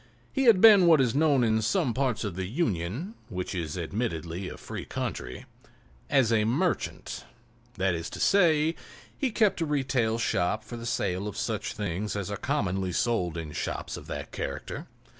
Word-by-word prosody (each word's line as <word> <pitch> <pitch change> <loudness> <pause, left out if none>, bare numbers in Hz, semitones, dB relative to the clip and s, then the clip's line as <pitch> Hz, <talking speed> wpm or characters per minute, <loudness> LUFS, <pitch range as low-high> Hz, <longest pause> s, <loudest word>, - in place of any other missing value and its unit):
He 270 -1 +1
had 220 -6 +6
been 205 -5 +8
what 160 -3 +7
is 125 -4 +2
known 145 -3 +3
in 110 -1 +2
some 130 - +1
parts 130 -4 0
of 100 -5 -3
the 95 0 -3
Union 115 - -2 0.2
(which 90 -3 -4
is 85 -3 -3
admittedly 90 -2 -3
a - - -8
free - - -6
country) 60 - -5 0.6
as 130 -5 +3
a 110 -1 +3
"merchant"; 145 - -1 0.5
that 95 -1 +1
is 85 0 -4
to - - -8
say, 165 -5 +4 0.4
he 270 - 0
kept 215 -5 +2
a - - +2
retail 130 -6 +1
shop 105 -1 0
for 120 - -8
the 115 0 -6
sale 100 -4 -1
of 105 - -6
such - - -2
things 105 0 -3
as 100 -1 -3
are - - -1
commonly 95 -9 -1
sold 90 -4 0
in 80 -2 -5
shops - - -4
of - - -9
that - - -6
character. - - -5
115 Hz, 180 wpm, -28 LUFS, 95-150 Hz, 0.6 s, been